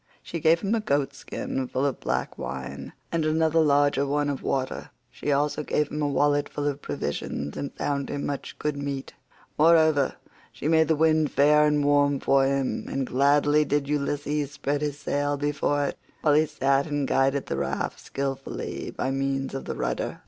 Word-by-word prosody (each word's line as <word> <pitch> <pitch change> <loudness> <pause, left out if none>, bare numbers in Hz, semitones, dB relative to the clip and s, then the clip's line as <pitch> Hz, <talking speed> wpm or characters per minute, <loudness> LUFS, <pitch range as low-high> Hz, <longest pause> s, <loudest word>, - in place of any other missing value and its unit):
She 170 - -5
gave 160 +2 +4
him 205 +2 0
a 230 - +2
goat 140 -9 0
skin 135 -1 -4
full 130 +2 -1
of 140 - -1
black - - -2
wine, 65 +1 -6 0.2
and 165 -1 0
another 160 +1 +2
larger 145 -2 +3
one 145 +1 0
of 140 - -5
water; 130 -1 -2 0.2
she 145 - -3
also 145 +1 +1
gave 150 0 0
him 150 - -3
a 145 - +1
wallet 145 +1 +2
full 145 - -4
of 145 0 -2
provisions, 70 - -4
and 140 - -4
found 140 -1 -2
him 145 - -3
in - - -3
much 140 -1 -5
good 150 -1 -2
meat. 140 -1 -4 0.5
Moreover, 155 -3 +4 0.4
she - - -5
made 160 -1 +4
the 160 - +3
wind 155 -1 +3
fair 150 +1 +4
and 150 -1 +2
warm 145 -1 +3
for 135 0 +3
him, 135 -1 -1
and 135 -1 -1
gladly 145 +3 +3
did 145 -1 0
Ulysses 145 0 -1
spread 145 0 -2
his 145 -1 -2
sail 145 0 -1
before 145 0 0
it, - - -4 0.2
while 150 - +4
he 155 +1 +4
sat 140 -1 +1
and 145 -2 -1
guided 135 +1 +2
the - - -3
raft - - -2
skilfully 135 0 -4
by 130 - -2
means 135 0 -1
of 135 - -5
the - - -4
rudder. - - -3
145 Hz, 190 wpm, -26 LUFS, 135-150 Hz, 0.5 s, gave